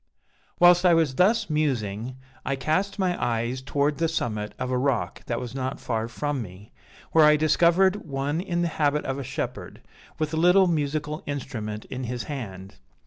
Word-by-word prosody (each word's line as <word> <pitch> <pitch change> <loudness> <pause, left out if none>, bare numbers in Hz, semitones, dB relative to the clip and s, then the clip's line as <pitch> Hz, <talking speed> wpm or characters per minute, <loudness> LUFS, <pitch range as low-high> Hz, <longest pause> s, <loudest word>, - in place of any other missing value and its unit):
"Whilst 175 0 +7
I 175 -2 +6
was 160 -5 +2
thus 210 - +3
musing, 125 -6 -1 0.3
I 140 - -1
cast 160 +10 -1
my 185 -3 0
eyes 120 +2 -1
towards 145 +2 0
the 165 - +2
summit 110 -9 -3
of 130 0 -3
a 125 - +1
rock 125 -9 -1
that 120 - -1
was 120 -1 -6
not 130 0 -3
far 115 -2 -2
from 145 +3 -3
me, 100 0 -11 0.4
where 160 - +6
I 150 0 +7
discovered 170 +5 +3
one 145 +2 -2
in 175 -2 -1
the - - +1
habit 150 -2 0
of 135 +1 -2
a - - -4
shepherd, - - -5 0.4
with 155 0 -2
a - - 0
little 180 +4 +5
musical 150 -2 -1
instrument 110 -7 -5
in 130 0 -5
his 120 +1 -4
hand. 100 -8 -7
145 Hz, 180 wpm, -25 LUFS, 120-165 Hz, 0.4 s, Whilst